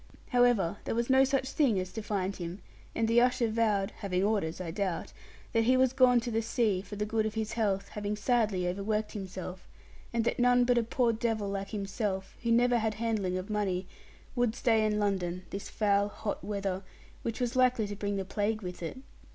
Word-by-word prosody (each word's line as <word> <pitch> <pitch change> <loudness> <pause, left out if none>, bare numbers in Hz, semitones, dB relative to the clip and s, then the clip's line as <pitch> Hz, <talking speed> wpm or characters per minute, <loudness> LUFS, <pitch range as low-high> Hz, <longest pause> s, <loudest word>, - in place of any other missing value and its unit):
However, 245 -8 +3
there - - -1
was 235 +2 0
no 265 0 +6
such 270 0 0
thing 250 -10 +2
as 185 0 -5
to 220 - -4
find 200 -2 -2
him; 175 0 -5 0.4
and 225 0 +1
the 230 +1 +5
usher 250 -1 +3
vowed 215 -3 +1
(having 190 -3 -1
orders 200 -6 0
I 175 -3 -4
doubt) 185 -1 -2 0.4
that 225 -1 +3
he 255 +2 +4
was 260 -1 +3
gone 255 -2 +5
to 240 0 -4
the 225 0 +1
sea 220 -4 +1
for 200 +2 -9
the 210 +1 -1
good 220 0 0
of 215 - -6
his 220 -1 -2
health, 200 -4 0
having 210 0 -3
sadly 210 -5 +1
overworked 210 +4 -1
himself; 185 -2 -7 0.4
and 235 -1 +1
that - - 0
none 245 0 +5
but 245 -1 +4
a - - +1
poor 235 +1 +1
devil 220 -3 -1
like 195 0 -3
himself, 195 -2 -3
who 235 - 0
never 240 +1 +4
had 220 -1 -1
handling 215 -5 -1
of 185 +4 -5
money, 195 -3 0 0.5
would 240 -2 +1
stay 225 -4 +3
in 210 -1 +1
London 185 -3 -1
this 195 - -5
foul, 200 -1 +2
hot 205 0 -4
weather; 195 -2 -2 0.4
which 230 +1 -3
was 245 0 -1
likely 255 -3 +3
to 205 0 -5
bring 200 0 -2
the 195 -1 -2
plague 210 +2 -1
with 180 -1 -6
it. 165 +8 -5
215 Hz, 210 wpm, -30 LUFS, 195-235 Hz, 0.5 s, no